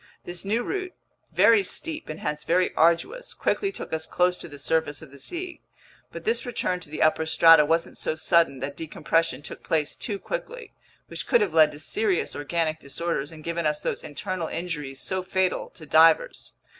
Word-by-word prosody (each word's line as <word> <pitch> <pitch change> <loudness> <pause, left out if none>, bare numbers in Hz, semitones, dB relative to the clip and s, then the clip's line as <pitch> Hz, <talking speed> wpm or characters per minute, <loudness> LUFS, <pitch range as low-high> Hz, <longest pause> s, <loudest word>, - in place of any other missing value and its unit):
This 175 0 -5
new 220 +5 0
route, 370 +2 -3 0.4
very 225 -3 +5
steep 315 - -2
and 155 - -5
hence 150 0 -3
very 180 +2 +2
arduous, 170 - +1
quickly 395 -1 0
took - - -8
us 160 0 -1
close 180 0 +2
to - - -7
the 145 -3 -11
surface 155 +1 -1
of 145 - -13
the 140 - -14
sea. 350 - -5 0.5
But - - -8
this 455 +2 0
return 215 -7 -2
to 170 - -11
the 155 - -1
upper 155 0 +2
strata 165 -1 +7
wasn't 165 +2 0
so - - -1
sudden 160 -4 +2
that 140 +1 -4
decompression 160 -2 -1
took - - -9
place 155 -3 -1
too 205 -4 -4
quickly, - - -6 0.3
which - - -7
could 240 -4 +4
have 195 -6 0
led 155 -2 +6
to 145 - -10
serious 410 - 0
organic 155 +1 -1
disorders 150 0 -3
and 155 -1 -12
given 170 -1 -1
us 150 0 0
those - - -3
internal 175 +3 -4
injuries 150 -6 -4
so 185 +5 -1
fatal 185 0 0
to 160 - -12
divers. 160 +2 +4
165 Hz, 190 wpm, -25 LUFS, 155-195 Hz, 0.5 s, strata